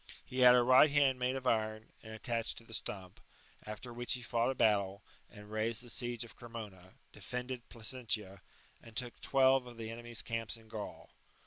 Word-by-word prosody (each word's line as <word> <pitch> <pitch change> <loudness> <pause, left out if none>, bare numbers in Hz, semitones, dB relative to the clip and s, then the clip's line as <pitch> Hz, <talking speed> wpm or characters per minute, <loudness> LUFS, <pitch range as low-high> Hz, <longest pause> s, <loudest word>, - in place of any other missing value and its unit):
He 130 - -5
had 125 -1 +9
a 125 - +5
right 130 +5 +7
hand 140 -3 +3
made 125 +1 +1
of 130 -1 -5
iron, 110 -2 0
and 110 - -10
attached 115 +1 -1
to - - -6
the 115 - -12
stump, 95 -3 -6 0.4
after 110 +3 -7
which 120 +1 0
he 125 - -7
fought 120 0 +1
a 135 - -1
battle, 100 -3 +2 0.3
and 105 -1 -13
raised 110 +2 -1
the 120 - -8
siege 120 +3 -3
of 120 - -12
Cremona, 105 -6 -9 0.2
defended 125 0 -5
Placentia, 110 -4 -3 0.4
and 115 -1 -14
took 125 -2 -2
twelve 130 -1 +4
of 120 -1 -11
the 115 -1 -5
enemy's 120 0 -3
camps 115 0 -2
in 110 -1 -18
Gaul. 110 -2 -7
115 Hz, 190 wpm, -34 LUFS, 110-125 Hz, 0.4 s, had